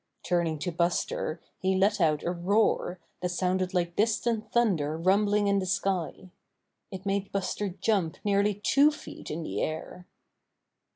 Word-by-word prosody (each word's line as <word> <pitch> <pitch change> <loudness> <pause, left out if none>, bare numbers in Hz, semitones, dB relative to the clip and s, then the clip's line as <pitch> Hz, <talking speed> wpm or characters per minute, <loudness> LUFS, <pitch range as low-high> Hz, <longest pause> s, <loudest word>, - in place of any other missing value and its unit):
Turning 170 -3 0
to 155 +4 -3
Buster 170 -1 -1 0.2
he 190 0 +1
let 200 +1 +2
out 155 -3 +2
a 175 - 0
roar 185 +1 +1 0.2
that 180 - -1
sounded 185 +1 0
like 175 -2 -1
distant 220 0 0
thunder 170 -11 +1
rumbling 205 +4 +3
in 200 0 +3
the 190 - -2
sky. 185 -1 -2 0.6
It 190 -1 -8
made 200 0 -1
Buster 200 +1 -2
jump 190 -3 0
nearly 205 0 +2
two 275 +8 +4
feet 300 - -9
in 165 +2 -4
the 100 -7 -3
air. 160 +3 -4
190 Hz, 150 wpm, -28 LUFS, 175-205 Hz, 0.6 s, two